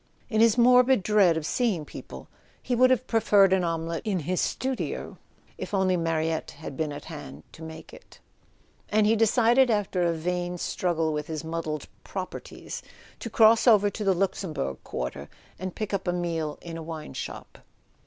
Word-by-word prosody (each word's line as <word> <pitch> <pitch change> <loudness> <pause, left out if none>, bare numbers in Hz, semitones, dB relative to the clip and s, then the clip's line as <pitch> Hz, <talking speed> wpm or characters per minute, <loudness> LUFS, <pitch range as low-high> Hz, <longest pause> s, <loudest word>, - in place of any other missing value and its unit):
In 220 0 +3
his 230 0 +5
morbid 250 -1 +5
dread 195 -5 +4
of 160 - -3
seeing 200 -7 0
people - - -10 0.3
he 255 - -3
would 255 +1 +5
have 255 -1 +2
preferred 205 -5 +4
an 190 -1 +2
omelette 165 0 -2
in 210 -4 0
the 185 - 0
studio, 260 +7 -3 0.4
if - - -4
only 190 -1 +2
Ma 165 -1 0
riette 160 0 -1
had 145 -2 -8
been 155 +1 -2
at 145 - -8
hand 70 +3 -9
to 160 - -14
make 160 0 -9
it; - - -15 0.7
and 215 0 +3
he 220 +2 +4
decided, 235 +3 +4
after 205 -4 0
a 170 -1 +2
vain 175 +2 -2
struggle 165 -3 -1
with 150 0 -3
his 160 -1 -4
muddled 160 -2 -4 0.2
"properties," 185 -2 -7 0.4
to 230 - -5
cross 225 +2 +5
over 205 -3 +6
to 215 - -5
the 195 -2 +3
Luxembourg 165 - -2
quarter 60 0 -5 0.3
and 185 0 -5
pick 215 -1 -4
up 195 -1 -2
a 175 - +1
meal 165 -4 -2
in 165 -1 -6
a - - -6
wine 160 -1 -7
shop. - - -7
180 Hz, 180 wpm, -26 LUFS, 160-215 Hz, 0.7 s, over